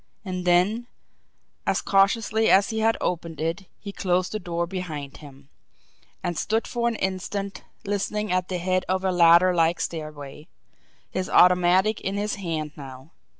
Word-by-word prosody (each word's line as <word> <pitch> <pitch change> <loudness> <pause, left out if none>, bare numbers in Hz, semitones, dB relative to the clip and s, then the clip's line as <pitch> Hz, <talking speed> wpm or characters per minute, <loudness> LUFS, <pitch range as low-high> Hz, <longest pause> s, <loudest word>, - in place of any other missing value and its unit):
And 185 -1 -4
then, 190 +7 +2 0.8
as - - +2
cautiously 215 +3 +2
as 195 +3 +4
he 220 - -2
had 225 +1 +2
opened 170 -2 -3
it, 165 +4 -3
he 200 - -7
closed 185 -2 0
the 215 - -3
door 170 -2 -2
behind 165 -6 -6
him, 140 -2 -15 0.7
and 175 - -2
stood 220 +7 -1
for 235 -1 -1
an 235 - 0
instant 190 0 -3 0.2
listening 205 +1 -2
at 180 0 0
the 185 - -3
head 185 +1 0
of 185 0 0
a 190 - +1
ladder 175 +1 +6
like 170 0 +2
stairway, 150 -2 -6 0.6
his 185 0 -3
automatic 180 +4 +4
in 195 +1 -3
his 205 +1 -1
hand 165 -6 -4
now. 135 +1 -11
185 Hz, 155 wpm, -24 LUFS, 170-200 Hz, 0.8 s, ladder